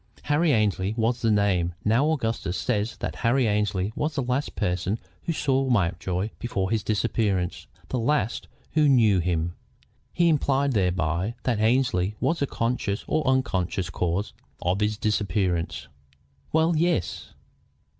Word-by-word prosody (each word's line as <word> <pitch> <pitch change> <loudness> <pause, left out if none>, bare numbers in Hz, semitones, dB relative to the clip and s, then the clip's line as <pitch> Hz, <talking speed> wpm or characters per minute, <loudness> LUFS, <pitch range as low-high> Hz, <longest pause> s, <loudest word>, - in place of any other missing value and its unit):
"Harry 150 +2 +2
Annesley 105 -3 +1
was 115 +1 +1
the 115 - +2
name. 95 -5 +2
Now, 120 +8 +3
Augustus 115 - -1
says 105 +3 -1
that - - -3
Harry 120 +1 +2
Annesley 105 -1 0
was 150 +1 -2
the 135 - 0
last 125 +4 -2
person 90 +4 -1 0.3
who - - 0
saw 135 -4 +1
Mountjoy 95 -2 0
before 95 -6 -2
his 110 -2 +1
disappearance, 105 -4 -1 0.2
the 130 - -1
last 120 -2 0 0.3
who 150 -2 +4
knew 110 -8 +5
him. 85 -1 -1 0.6
He 175 -1 +2
implies 140 -3 +2
thereby 90 +1 0
that 120 -4 0
Annesley 110 -4 +2
was 165 - 0
the 140 - 0
conscious 115 -5 -1
or 155 -2 0
unconscious 95 -9 0
cause 90 +5 -1 0.3
of 90 +3 +1
his 105 0 0
disappearance." 90 -9 -1 0.6
"Well, 160 +1 +3
yes." 165 - -1
110 Hz, 140 wpm, -25 LUFS, 95-130 Hz, 0.6 s, knew